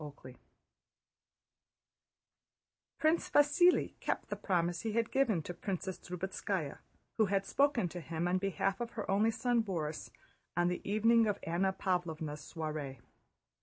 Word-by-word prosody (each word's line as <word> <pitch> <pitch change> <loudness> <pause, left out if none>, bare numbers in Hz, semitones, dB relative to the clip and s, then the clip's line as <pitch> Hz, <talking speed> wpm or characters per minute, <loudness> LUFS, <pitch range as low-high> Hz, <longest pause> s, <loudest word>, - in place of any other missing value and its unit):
CHAPTER 145 -3 -10
X 125 - -14 2.6
Prince 315 +2 +2
Vasíli 295 +5 +4
kept - - -2
the - - -2
promise 175 -2 0
he 220 -2 -2
had 230 0 0
given 225 - +2
to 175 - -5
Princess 185 -1 -4
Drubetskáya 180 -3 -3 0.4
who 220 -2 +4
had 195 0 +1
spoken 275 -4 +2
to 175 - -6
him 165 +1 -2
on 185 +1 +2
behalf 195 +2 -1
of 235 -1 -4
her 220 - -4
only 210 +3 +4
son 235 +1 +1
Borís 160 -7 -3 0.5
on 175 0 +3
the 180 - -2
evening 225 +2 +4
of 205 -1 0
Anna 180 +4 +1
Pávlovna's 170 -5 -2
soiree. 155 -4 -5
190 Hz, 140 wpm, -33 LUFS, 170-225 Hz, 2.6 s, Vasíli